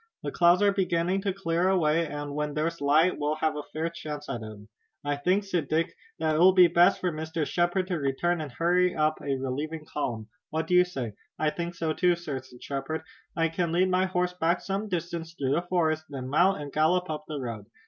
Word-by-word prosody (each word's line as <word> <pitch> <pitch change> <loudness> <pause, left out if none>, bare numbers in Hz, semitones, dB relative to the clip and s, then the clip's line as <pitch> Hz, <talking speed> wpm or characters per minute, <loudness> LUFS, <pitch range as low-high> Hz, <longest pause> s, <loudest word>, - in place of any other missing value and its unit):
The - - -3
clouds 175 +3 +4
are 200 - +5
beginning 185 -1 0
to 200 0 0
clear 180 -1 0
away, 165 -3 +2
and 145 -1 -5
when 150 0 -2
there's 165 +1 -1
light 155 +5 +3
we'll 150 +1 0
have 155 0 0
a 150 - -3
fair 160 +1 -2
chance 150 -3 -6
at 120 - -3
'em." 110 -1 -9 0.4
"I 145 0 0
think," 180 +8 +1
said 180 -7 -2
Dick, 165 +4 0 0.2
"that 160 -1 +1
it - - +1
will 185 +2 +7
be 180 -1 +8
best 175 +3 +4
for 180 - 0
Mr. 160 0 -3
Shepard 175 +3 +1
to 180 -3 -2
return 155 +5 0
and 150 -3 -6
hurry 180 +5 +2
up 155 0 +1
a 135 -1 -1
relieving 150 +4 -4
column. 115 -8 -4 0.2
What 160 +1 -1
do 180 - -2
you 180 0 +6
say?" 130 - -5 0.2
"I 155 -1 +1
think 170 +1 -4
so 160 -2 -1
too, 180 +2 +3
sir," 150 -6 -5
said 125 -1 -16
Shepard. 140 +3 -3 0.3
"I 165 -1 +2
can 170 0 -1
lead 180 +2 +3
my 185 +1 +3
horse 180 -1 0
back 175 0 +1
some 200 +2 -3
distance 170 -2 -4
through 135 -4 -1
the 170 - +2
forest, 160 -3 0
then 130 -3 -6
mount 180 +6 +3
and 145 -2 -7
gallop 175 +4 +2
up 150 0 -5
the 150 -2 -4
road. 115 -5 -6
165 Hz, 225 wpm, -27 LUFS, 150-180 Hz, 0.4 s, be